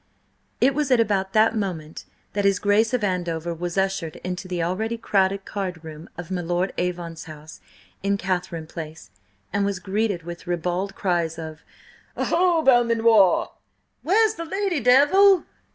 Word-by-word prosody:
It 270 +2 +4
was 295 0 -1
at 250 -2 +4
about 195 -4 0
that 220 +1 +4
moment 170 -7 -4 0.3
that 205 - -1
his 200 -1 +3
Grace 210 +3 +2
of 250 -4 0
Andover 175 -3 -2
was 175 +2 -5
ushered 190 -5 -1
into 180 +1 -4
the 180 -2 -2
already 220 +7 -2
crowded 195 -3 0
card 185 -5 -5
room 160 0 -10
of 175 +1 -8
my 180 -1 -1
Lord 175 +2 -1
Avon's 175 -2 -4
house 155 0 -12 0.4
in 200 +1 0
Catharine 180 -4 -3
Place, 155 - -9 0.4
and 200 0 +1
was 200 -1 -1
greeted 195 -1 -2
with 175 +1 -9
ribald 180 +3 -2
cries 170 -4 -1
of 160 -1 -8 0.6
"Oho, 345 -2 +2
Belmanoir!", 230 - +5
and - - -8 0.5
"Where's 435 +5 +3
the 335 -6 -6
lady, 385 -1 -1
Devil?" 295 - +5
190 Hz, 155 wpm, -23 LUFS, 175-225 Hz, 0.6 s, Belmanoir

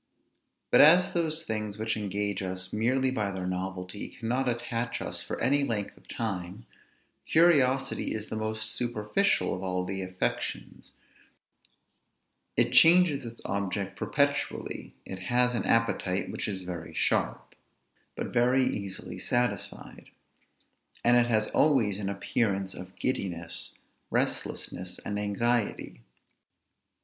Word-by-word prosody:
But - - +8
as 175 +5 +7
those 160 -1 +1
things, 110 -2 -3
which 110 0 -1
engage 100 -1 -2
us 95 0 -4
merely 130 +5 +2
by 110 -5 -1
their 95 -2 -4
novelty, 90 +1 -4
cannot 125 +3 -1
attach 120 0 -2
us - - -3
for - - -5
any 140 +4 +3
length 110 -7 -2
of - - -22
time, 100 -1 -4 0.6
curiosity 140 -6 +3
is 105 -1 -4
the - - -6
most 110 0 -3
superficial 120 - 0
of 90 - -4
all 90 -1 -1
the 95 +1 -3
affections; 95 0 -4 1.6
it - - +3
changes 165 -4 +6
its 115 -1 -9
object 100 0 -2
perpetually; 145 0 -1
it 95 - -6
has 125 +6 +2
an 115 - -1
appetite 105 -5 +1
which - - -3
is 95 -3 -3
very 85 -3 -7
sharp, - - 0 0.6
but - - -5
very 125 +2 +4
easily 100 -5 -4
satisfied; 120 0 -2 0.9
and 120 +1 +5
it 120 0 +5
has 110 -2 +2
always 115 -10 +3
an 100 -1 -2
appearance 100 -1 -1
of 90 0 -9
giddiness, 85 -9 -2 0.3
restlessness, 90 0 -2
and 105 0 -2
anxiety. 105 - -1
110 Hz, 125 wpm, -29 LUFS, 95-125 Hz, 1.6 s, But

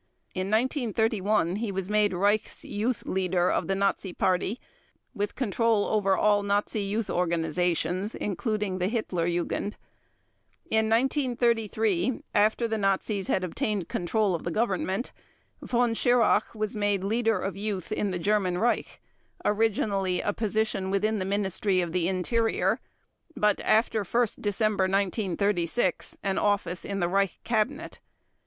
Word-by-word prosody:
In 185 +1 -2
1931 220 - +1
he 220 -1 -2
was 190 -1 -3
made 210 0 +2
Reichs 205 +4 +1
Youth 220 +3 -2
Leader 185 -1 +1
of - - 0
the 195 - 0
Nazi 195 -1 0
Party 185 +6 0 0.5
with 205 0 -3
control 230 -3 +1
over 195 -3 +2
all 205 -1 +3
Nazi 205 +1 0
youth 205 +2 -2
organizations, 175 +3 0
including 205 -1 -2
the 180 - +1
Hitler 195 -6 -1
Jugend. 175 +4 -2 1.0
In 220 0 +2
1933, 230 - +1
after 215 +3 +3
the 220 -1 -2
Nazis 195 0 0
had 190 - +1
obtained 185 +1 -2
control 200 +2 0
of 170 - -3
the - - -2
Government, 195 +2 -1 0.5
Von 240 -1 +1
Schirach 245 0 +2
was 215 -1 -3
made 205 -2 0
Leader 225 +1 +1
of 190 0 -3
Youth 200 -3 -4
in 205 - 0
the 185 - -2
German 190 -1 +1
Reich, 235 +5 0 0.5
originally 200 -3 +1
a 205 - -1
position 215 -3 -1
within 210 +2 +1
the 185 - -2
Ministry 195 -1 0
of 175 -2 -1
the 175 -1 0
Interior, 225 +5 +1 0.6
but, 210 -1 +2
after 220 -1 +2
1 235 +5 +2
December 205 -1 +1
1936, 195 0 0
an 195 -1 0
office 195 -4 0
in 200 0 -3
the 175 - +2
Reich 195 +1 +1
Cabinet. 235 +5 -1
205 Hz, 135 wpm, -27 LUFS, 185-220 Hz, 1.0 s, all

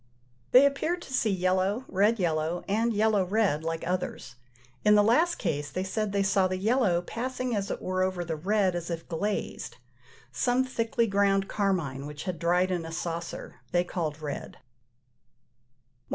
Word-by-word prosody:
They 255 +3 +7
appeared 315 +5 0
to 265 - -10
see 230 -3 +2
yellow, 190 +5 +1
red 205 +4 +2
yellow, 165 -1 -1
and 225 +4 +1
yellow 215 -2 +2
red, 185 -5 +1
like 165 0 -3
others: 180 -7 -3 0.5
in 210 0 +6
the 205 - +6
last 315 +11 +3
case 145 -5 -2
they 185 +6 -3
said 210 +2 -2
they 200 0 +1
saw 195 -1 +3
the 185 0 -2
yellow 200 -4 +2
passing 255 +3 -3
as 200 -1 -2
it - - -4
were 185 0 -1
over 185 -2 -1
the 165 -1 -2
red 190 +3 +1
as 175 0 -4
if 165 -1 -5
glazed: 200 +5 -3 0.5
some 250 +1 +1
thickly 235 -1 0
ground 195 -1 +2
carmine, 170 -11 -1
which 150 0 -7
had 180 -3 -4
dried 180 +2 +2
in 175 -2 -1
a 165 - -7
saucer, 170 0 -5 0.2
they 175 0 +3
called 160 -4 -4
red. 145 - -5
107. - - -27
190 Hz, 170 wpm, -28 LUFS, 170-215 Hz, 0.5 s, They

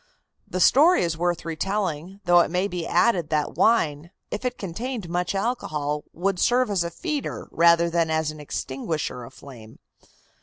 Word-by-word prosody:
The 185 - -3
story 300 - +5
is 170 -2 -1
worth 175 0 -1
retelling, 185 +1 -3
though 175 0 +6
it - - +3
may 180 +3 0
be 175 -4 -4
added 180 -9 +2
that 150 -1 0
wine, 165 -8 +2 0.2
if 210 - -4
it 250 -1 -2
contained 215 +3 -5
much 175 +3 -2
alcohol, 150 - -2
would 185 +2 -1
serve 245 -2 +2
as 190 -4 +1
a 170 - -3
feeder 300 - -4
rather 170 0 +4
than 170 -1 0
as 160 -1 0
an 155 - -11
extinguisher 140 -1 -4
of 115 - -12
flame. 115 -6 -13
170 Hz, 165 wpm, -24 LUFS, 155-200 Hz, 0.2 s, though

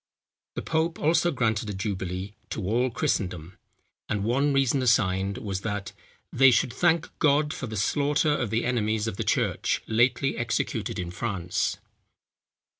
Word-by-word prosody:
The - - -4
pope 165 +1 0
also 165 +2 +2
granted 110 -7 0
a 100 - -4
jubilee 95 -1 -4 0.2
to 105 - -4
all 120 +6 +1
Christendom, 90 -6 -2 0.5
and 105 -1 -1
one 135 +6 +2
reason 135 -1 +2
assigned 100 -5 +2
was, 95 -3 -4
that 100 -2 -4 0.4
they 135 +1 +7
should 120 -1 +2
thank 160 +5 +2
God 150 0 +3
for 130 - -5
the 110 -1 -5
slaughter 145 +8 +1
of 125 -7 -2
the 110 +2 0
enemies 110 -3 0
of 110 -4 -4
the - - -1
church, - - 0
lately 120 +4 +2
executed 120 -1 -2
in 90 -1 -4
France. 90 -3 -2
115 Hz, 150 wpm, -26 LUFS, 100-135 Hz, 0.5 s, they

